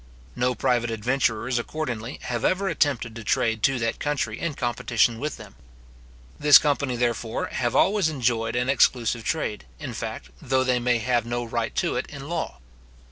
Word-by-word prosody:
No 125 0 +1
private 120 +1 +1
adventurers, 120 +1 0
accordingly, 125 -3 -4
have 120 -2 -3
ever 195 +1 +1
attempted 140 -9 0
to 115 - -7
trade 110 +1 +1
to 135 +4 +3
that 115 -1 -2
country 135 -7 -2
in 170 -4 -2
competition 120 -2 +1
with 150 +2 -3
them. 105 -3 -12 0.9
This 150 0 +9
company, 140 -4 0
therefore, 120 -2 -1
have 120 -2 -1
always 195 -4 +3
enjoyed 120 -6 0
an 125 +1 0
exclusive 120 -3 +2
trade, 110 - -2
in - - -6
fact, 60 0 -6
though 130 0 +1
they 125 -1 +2
may 120 0 +2
have 120 0 0
no 120 0 -2
right 115 -1 -3
to 175 - 0
it - - -2
in 140 -1 -8
law. 170 0 -3
120 Hz, 170 wpm, -25 LUFS, 115-140 Hz, 0.9 s, This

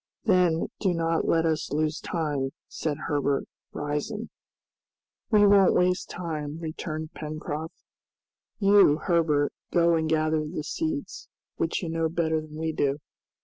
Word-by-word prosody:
"Then 180 -6 +3
do 185 -4 +1
not 165 0 0
let 165 0 +3
us 160 -2 -1
lose 155 +1 0
time," 145 -5 -2
said 150 -3 -3
Herbert, 145 -2 0 0.3
rising. 150 +10 -3 1.0
"We 210 -2 +6
won't 200 -2 +6
waste 180 0 +2
time," 155 -4 -4
returned 155 -1 -5
Pencroft. 155 0 -5 0.8
"You, 200 -7 +6
Herbert, 160 -4 +1 0.2
go 170 0 +4
and 160 -1 +1
gather 155 0 +1
the 150 0 -4
seeds, 315 - -4 0.3
which 165 +3 -1
you 170 - -3
know 165 0 0
better 160 -1 0
than 155 0 -11
we 160 +1 -2
do. 140 -2 +1
160 Hz, 135 wpm, -27 LUFS, 155-175 Hz, 1.0 s, We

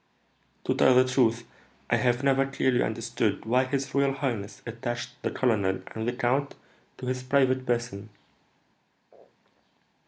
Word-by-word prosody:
"To - - +1
tell 130 - +5
the 130 0 +6
truth, 120 -3 +1 0.4
I - - +4
have 125 +1 +1
never 135 0 +3
clearly 130 -2 +1
understood 115 -1 -1
why 125 +3 +2
his 135 0 -3
royal 140 0 +2
highness 120 -8 -4
attached 120 0 -4
the - - -1
colonel 100 -7 0
and 110 +1 -4
the 120 - 0
count 135 +3 0 0.4
to 130 - -7
his 130 0 -2
private 130 -1 +2
person." 115 -4 -2
125 Hz, 135 wpm, -27 LUFS, 115-130 Hz, 0.4 s, the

